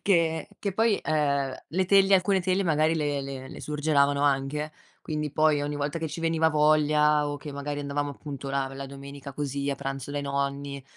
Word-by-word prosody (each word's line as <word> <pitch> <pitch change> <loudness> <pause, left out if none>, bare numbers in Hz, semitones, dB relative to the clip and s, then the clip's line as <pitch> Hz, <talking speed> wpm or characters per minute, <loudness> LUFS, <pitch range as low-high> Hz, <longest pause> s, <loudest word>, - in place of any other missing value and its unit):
che 165 -4 +2
che 200 - -2
poi, 220 +1 +2
ehm, 140 -3 +1
le 185 +3 +1
teglie, 195 +1 +5
alcune 190 +1 +3
teglie 185 +2 +1
magari 155 0 +2
le 145 -3 0
le 135 -1 -6
le - - -9
surgelavano 145 -2 +2
anche. 145 +2 0 0.3
Quindi 150 -1 -3
poi 155 0 +3
ogni 145 0 -2
volta 145 +3 -2
che 160 - -3
ci 155 +3 -6
veniva 165 -1 +2
voglia 150 -1 +3
o 145 - -3
che 145 +1 -8
magari 145 +1 -4
andavamo 145 0 -2
appunto 140 -1 -7
la 135 0 0
la 135 0 -6
domenica 140 0 -9
così, 140 -1 -2
a 140 - +1
pranzo 135 0 -5
dai 145 0 -2
nonni, 140 0 -2
145 Hz, 190 wpm, -27 LUFS, 140-155 Hz, 0.3 s, teglie